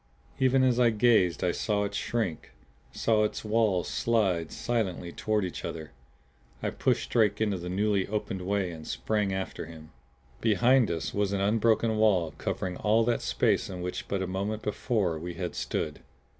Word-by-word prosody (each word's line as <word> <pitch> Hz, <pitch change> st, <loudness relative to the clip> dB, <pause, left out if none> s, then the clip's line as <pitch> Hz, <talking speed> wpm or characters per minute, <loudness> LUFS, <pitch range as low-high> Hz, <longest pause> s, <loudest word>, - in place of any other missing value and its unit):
Even 130 Hz, 0 st, +4 dB
as 125 Hz, -2 st, +3 dB
I 120 Hz, -1 st, +5 dB
gazed 110 Hz, -5 st, +3 dB
I 90 Hz, -, +2 dB
saw 105 Hz, +1 st, 0 dB
it 100 Hz, -, -3 dB
shrink; 110 Hz, -9 st, -2 dB, 0.4 s
saw 110 Hz, -2 st, +2 dB
its 105 Hz, -, -2 dB
walls 105 Hz, -5 st, +2 dB
slide 95 Hz, -8 st, +1 dB
silently 95 Hz, -7 st, -2 dB
toward 105 Hz, 0 st, 0 dB
each 90 Hz, -, -6 dB
other. 80 Hz, -3 st, -6 dB, 0.7 s
I -, -, 0 dB
pushed 60 Hz, 0 st, 0 dB
Drake 105 Hz, -3 st, +3 dB
into 105 Hz, -3 st, +1 dB
the 90 Hz, +1 st, -5 dB
newly 100 Hz, +1 st, +1 dB
opened 100 Hz, -2 st, -3 dB
way 95 Hz, -1 st, -1 dB
and 80 Hz, -2 st, -9 dB
sprang 105 Hz, -3 st, -1 dB
after 95 Hz, 0 st, -4 dB
him. 80 Hz, -1 st, -12 dB, 0.5 s
Behind 120 Hz, +3 st, +4 dB
us 80 Hz, -1 st, -3 dB
was 100 Hz, -1 st, 0 dB
an 100 Hz, -, 0 dB
unbroken 110 Hz, +2 st, +2 dB
wall 95 Hz, -8 st, +3 dB
covering 90 Hz, -1 st, -3 dB
all 110 Hz, +2 st, +3 dB
that 120 Hz, 0 st, +1 dB
space -, -, +1 dB
in 90 Hz, -2 st, -6 dB
which 90 Hz, -, -4 dB
but 100 Hz, -1 st, -1 dB
a -, -, -1 dB
moment 100 Hz, +4 st, -3 dB
before 105 Hz, -6 st, -1 dB
we 85 Hz, +1 st, -6 dB
had 90 Hz, -2 st, -4 dB
stood! -, -, -3 dB
100 Hz, 170 wpm, -28 LUFS, 90-110 Hz, 0.7 s, I